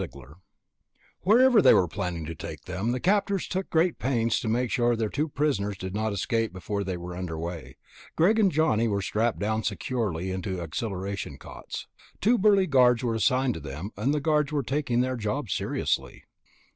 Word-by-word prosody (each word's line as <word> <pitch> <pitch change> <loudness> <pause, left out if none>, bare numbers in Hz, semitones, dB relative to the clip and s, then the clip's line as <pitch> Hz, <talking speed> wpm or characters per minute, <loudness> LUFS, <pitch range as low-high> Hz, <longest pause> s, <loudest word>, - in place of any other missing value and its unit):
Prisoners 70 +3 -9 0.8
Wherever 240 +3 +5
they - - +7
were 90 - +3
planning 85 -1 -4
to 80 - -5
take 80 - -8
them, 105 +6 -2
the 125 - -1
captors 200 +2 +1
took 190 +1 -3
great 165 +1 +2
pains 115 -3 +1
to - - -4
make 120 +2 0
sure 120 -2 +2
that - - -7
their 110 -2 0
two 150 +6 -1
prisoners 110 -10 -1
did 95 0 -6
not 110 +1 -1
escape 115 +2 -1
before 100 +2 -3
they 95 -2 -3
were 90 0 -7
underway. 80 -6 -5 0.4
Greg 210 +7 +4
and 200 -4 +4
Johnny 140 -8 +2
were 100 -2 -1
strapped 110 +4 0
down 110 +2 -1
securely 100 -3 -2
into 95 0 -3
accelleration 95 - -4
cots. - - -8 0.3
Two 235 +3 +3
burly 200 -1 +5
guards 125 -5 +4
were 120 -2 0
assigned 125 +2 +2
to - - -6
them, 75 +7 -7
and 110 +8 0
the 150 - +1
guards 150 -1 +1
were 145 -2 0
taking 130 -2 0
their 130 0 -1
job 115 +2 -3
seriously. - - -2
115 Hz, 185 wpm, -27 LUFS, 95-145 Hz, 0.8 s, they